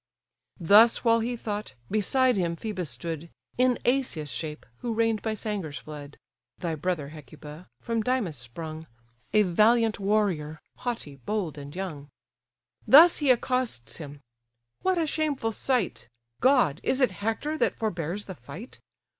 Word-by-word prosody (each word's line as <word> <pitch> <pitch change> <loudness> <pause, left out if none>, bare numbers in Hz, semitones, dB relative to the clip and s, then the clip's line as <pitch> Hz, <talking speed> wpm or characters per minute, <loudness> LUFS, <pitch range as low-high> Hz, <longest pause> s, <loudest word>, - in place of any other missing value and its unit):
Thus 210 +7 +6
while 230 -1 +4
he 240 +2 -2
thought, 210 - -5 0.2
beside 250 +4 +3
him 170 -3 0
Phœbus 185 -2 -4
stood, 160 +5 -5 0.3
In 255 -1 +4
Asius' 240 - 0
shape, 150 +5 -5
who 235 -2 -3
reigned 225 -1 +1
by 220 -1 -2
Sangar's 195 -9 -4
flood; 145 +1 -9 0.4
(Thy 170 -2 -3
brother, 155 -2 -2
Hecuba! 150 +2 -11
from 230 -1 -1
Dymas 220 -8 0
sprung, 155 +6 -8 0.4
A 215 0 +5
valiant 215 +4 +3
warrior, 195 -7 0 0.2
haughty, 230 - -4
bold, 175 - -3
and 145 +2 -9
young;) 155 -7 -5 0.8
Thus 330 +5 +8
he 290 -3 +1
accosts 250 - +1
him. 145 -3 -9 0.6
"What 375 -1 +1
a 330 - +2
shameful 295 -7 -1
sight! 240 - -1 0.3
God! 255 - +4
is 260 - 0
it 255 -6 +3
Hector 225 +9 -1
that - - +1
forbears 185 -2 -3
the 190 - -7
fight? 155 - -11
200 Hz, 140 wpm, -27 LUFS, 155-235 Hz, 0.8 s, Thus